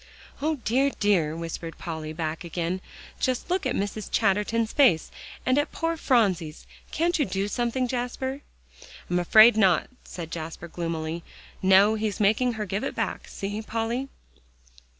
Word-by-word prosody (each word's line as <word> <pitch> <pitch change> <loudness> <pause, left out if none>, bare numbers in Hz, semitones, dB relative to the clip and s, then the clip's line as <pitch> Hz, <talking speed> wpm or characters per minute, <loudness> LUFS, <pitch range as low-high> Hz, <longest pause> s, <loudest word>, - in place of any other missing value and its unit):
"O 310 +2 +1
dear, 265 +2 +1
dear!" 175 -7 +2
whispered 165 0 -6
Polly, 160 -2 -5
back 160 +1 -4
again, 175 +2 -3 0.4
"just 255 +6 -1
look 365 -6 +1
at 250 - -1
Mrs. 205 +1 -3
Chatterton's 215 +3 +1
face, 250 - +4 0.3
and 255 +2 +3
at 290 - -1
poor 330 0 -1
Phronsie's; 190 - +1 0.2
can't 340 +2 0
you - - +4
do 195 -2 -1
something, 240 +3 -1
Jasper?" 260 +2 -3 0.7
"I'm 175 - +2
afraid 215 +6 +7
not," 190 -4 +3
said 165 -3 -8
Jasper 165 +1 -6
gloomily. 165 -1 -4 0.4
"No; 195 +3 +6
he's 215 -2 -2
making 220 +4 +3
her 215 -1 -3
give 200 +2 -3
it - - -3
back; - - -3
see, 205 +2 -4
Polly." 230 +4 -2
210 Hz, 150 wpm, -26 LUFS, 170-250 Hz, 0.7 s, afraid